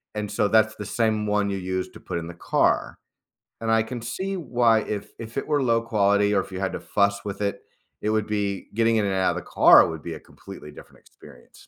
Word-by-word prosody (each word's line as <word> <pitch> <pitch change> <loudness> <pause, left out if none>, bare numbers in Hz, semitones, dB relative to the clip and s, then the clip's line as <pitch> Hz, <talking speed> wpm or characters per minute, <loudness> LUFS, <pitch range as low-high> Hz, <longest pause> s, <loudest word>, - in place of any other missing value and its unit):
And 105 -1 -4
so, 105 - +1
that's 110 0 +3
the 105 - -7
same 110 -2 0
one 105 -1 +1
you 100 - -2
use 95 0 -3
to - - -13
put - - -5
in 85 - -7
the 85 - -8
car. - - 0 0.6
And 115 0 -1
I 115 0 +4
can 115 +1 -6
see 190 +12 -4
why 120 -7 +2
if 105 0 -5
if 115 +2 -8
it - - -2
were 145 -2 +1
low 115 -2 +2
quality, 100 -2 +2
or 95 - +3
if - - -11
you 95 - -5
had 95 -1 -2
to - - -4
fuss 100 -1 0
with 100 0 -5
it, 100 -1 -2 0.4
it 105 - -1
would 110 -1 0
be 100 -2 -2
getting 115 0 +3
in 105 - +1
and 95 - -1
out 95 -1 +2
of - - -5
the - - -4
car - - +6
would 80 -2 -6
be 85 - -5
a 80 - -8
completely - - -12
different - - -15
experience. 70 -4 -18
105 Hz, 245 wpm, -24 LUFS, 100-115 Hz, 0.6 s, car